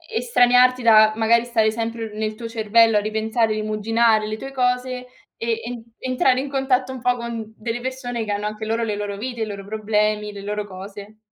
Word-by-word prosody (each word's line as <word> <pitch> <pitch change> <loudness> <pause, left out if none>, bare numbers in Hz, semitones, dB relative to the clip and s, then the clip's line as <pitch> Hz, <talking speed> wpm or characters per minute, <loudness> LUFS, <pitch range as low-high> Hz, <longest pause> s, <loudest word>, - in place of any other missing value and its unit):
estraniarti 250 - +4
da, 215 -2 +6
magari, 230 +1 +3
stare 225 -2 +2
sempre 225 -1 -4
nel 215 0 -2
tuo 230 +1 -7
cervello 225 0 +3
a 210 - +4
ripensare, 220 +1 0
rimuginare 215 +1 +1
le 215 0 -4
tue 270 +4 -8
cose 250 0 -1 0.3
e 230 0 -2
en 240 -1 -6 0.2
entrare 255 0 +2
in 275 +1 -4
contatto 265 -1 0
un 255 - -8
po' 245 0 +1
con 230 -2 -6
delle 230 +2 -4
persone 250 -2 -4
che 210 - -4
hanno 205 +1 -2
anche 215 +1 -4
loro 225 +1 -1
le 210 - -2
loro 205 -1 -4
vite, 240 +1 -5
i - - +1
loro 200 -2 -7
problemi, 210 0 0
le 200 - -9
loro 210 +1 -3
cose. 200 +2 -10
225 Hz, 195 wpm, -22 LUFS, 215-245 Hz, 0.3 s, da